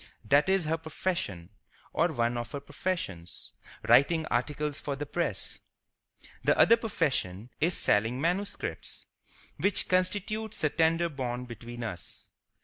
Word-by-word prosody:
That 145 - +4
is 190 -3 +3
her 160 +1 0
profession, 160 - -3 0.4
or 165 +1 +2
one 120 -4 +1
of 120 0 -4
her 140 - -2
professions—writing 145 - 0
articles 150 +4 0
for 140 - -3
the 145 +2 -4
press. 145 - -2 0.8
The - - +3
other 230 - +7
profession 130 - -1
is 170 +3 +2
selling 110 +5 +2
manuscripts, 185 +6 -2 0.5
which 200 -1 +2
constitutes 205 +4 0
the 150 - +2
tender 165 +2 +3
bond 125 -5 -4
between 120 +1 -7
us. 90 -6 -6
150 Hz, 125 wpm, -29 LUFS, 120-175 Hz, 0.8 s, other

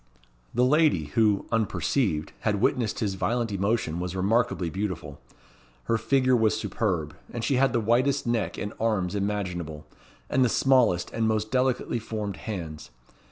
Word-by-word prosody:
The 125 +2 +2
lady 150 - +3
who, 105 -3 +3
unperceived, 110 - 0
had 105 -2 0
witnessed 115 0 0
his 100 -3 0
violent 115 +3 -1
emotion 100 -4 0
was 90 0 -4
remarkably 95 -3 +1
beautiful. 90 -8 -4 0.6
Her 115 - 0
figure 130 +2 +3
was 110 -2 +2
superb; 85 -9 -2 0.2
and 120 - -5
she 135 - +1
had 135 +1 +3
the 120 - +1
whitest 125 +5 +2
neck 115 -7 -1
and 105 - -4
arms 105 -5 0
imaginable, 90 -7 -3 0.4
and 130 - +2
the 125 - +3
smallest 125 -10 +3
and 115 -1 0
most 110 -1 0
delicately 125 -2 +1
formed 105 -3 -4
hands. 85 - -6
110 Hz, 150 wpm, -26 LUFS, 95-120 Hz, 0.6 s, lady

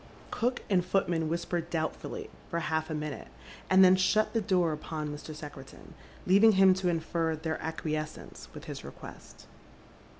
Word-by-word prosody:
Cook 245 +2 -1
and 185 -4 +2
footman 175 -3 0
whisper 170 +1 -1
doubtfully 160 -1 -4 0.2
for 170 - -2
half 160 -1 -1
a 155 - -2
minute, 150 -2 -5 0.4
and 190 0 +7
then 185 0 +7
shut 205 +3 +2
the 225 - +1
door 185 -5 +2
upon 155 0 -4
Mr. 150 +1 -9
Secretan, 145 -3 -11 0.3
leaving 205 +4 +6
him 190 -1 +6
to 185 -1 0
infer 165 -1 -1
their 160 0 -4
acquiescence 155 -1 -5
with - - -10
his - - -7
request. - - -11
165 Hz, 155 wpm, -30 LUFS, 155-190 Hz, 0.4 s, and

